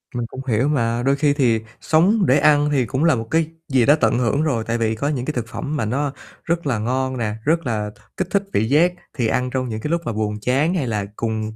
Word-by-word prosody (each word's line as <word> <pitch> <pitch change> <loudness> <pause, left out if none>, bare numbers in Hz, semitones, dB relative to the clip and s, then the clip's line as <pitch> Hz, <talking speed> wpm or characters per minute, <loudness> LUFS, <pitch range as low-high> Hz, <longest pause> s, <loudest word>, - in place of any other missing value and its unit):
Mình 120 -1 -1
cũng 130 - -8
hiểu 120 +2 +2
mà. 120 -5 0
Đôi 135 +2 +3
khi 145 0 +2
thì 120 -6 +2 0.2
sống 190 +6 +3
để 130 - +4
ăn 150 -1 +4
thì 130 -4 +2
cũng 130 +6 -1
là 165 -4 +4
một 115 -1 -4
cái 160 -1 +2 0.2
gì 130 -4 +3
đó 145 - +6
tận - - +3
hưởng 125 +4 +1
rồi, 130 -8 0
tại 115 0 0
vì 110 -1 0
có 130 +6 -2
những 130 -5 -2
cái 155 - -2
thực 120 -4 -3
phẩm 145 +5 -4
mà 135 - -1
nó 135 +5 -1 0.3
rất 170 -2 -1
là 120 -5 0
ngon 130 +3 -1
nè, 110 -3 -1
rất 165 +2 +1
là 105 -4 -2 0.3
kích - - -1
thích 200 -1 +2
vị 110 +2 +1
giác, 165 +6 +4 0.2
thì 120 -3 +1
ăn 125 +3 0
trong 130 -1 -2
những 110 -1 -4
cái 150 - -3
lúc 170 0 +1
mà - - -1
buồn 105 0 -2
chán 135 +9 +1
hay 155 -9 -1
là 105 -3 -1
cùng 110 -1 -3
130 Hz, 265 wpm, -21 LUFS, 115-150 Hz, 0.3 s, đó